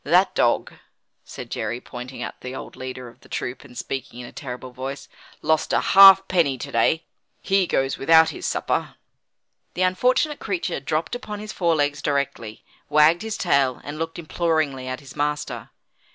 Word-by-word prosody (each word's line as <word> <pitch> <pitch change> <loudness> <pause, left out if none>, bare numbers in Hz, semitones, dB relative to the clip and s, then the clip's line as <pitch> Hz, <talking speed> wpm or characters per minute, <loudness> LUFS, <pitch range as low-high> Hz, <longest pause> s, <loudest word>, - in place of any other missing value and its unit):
That - - +3
dog," - - +1 0.5
said - - -10
Jerry, 120 - -3
pointing 125 +1 -8
out - - -8
the 125 +1 -6
old - - -8
leader 130 -1 -7
of 120 - -15
the - - -20
troop, 125 - -4
and 125 -4 -14
speaking 130 -2 -5
in 125 - -7
a - - -10
terrible 125 -2 -7
voice, 135 +3 -6 0.4
"lost 160 0 +1
a - - +4
halfpenny 190 -7 +6
to - - -7
day. 115 +8 +2 0.4
He 195 -2 +1
goes 135 -3 0
without 160 +3 +6
his 160 - -5
supper." - - -1 0.8
The 185 - +1
unfortunate 250 +11 +2
creature 185 -9 -2
dropped 155 +4 -2
upon 210 -4 -5
his 215 0 -7
forelegs 155 -5 +1
directly, 140 -6 -2 0.3
wagged 150 +4 +5
his 220 -1 -4
tail, 140 -7 +2
and 145 +2 -7
looked 165 0 -4
imploringly 155 -5 -1
at 130 +2 -4
his 140 - -13
master. 150 0 -3
150 Hz, 165 wpm, -23 LUFS, 130-170 Hz, 0.8 s, halfpenny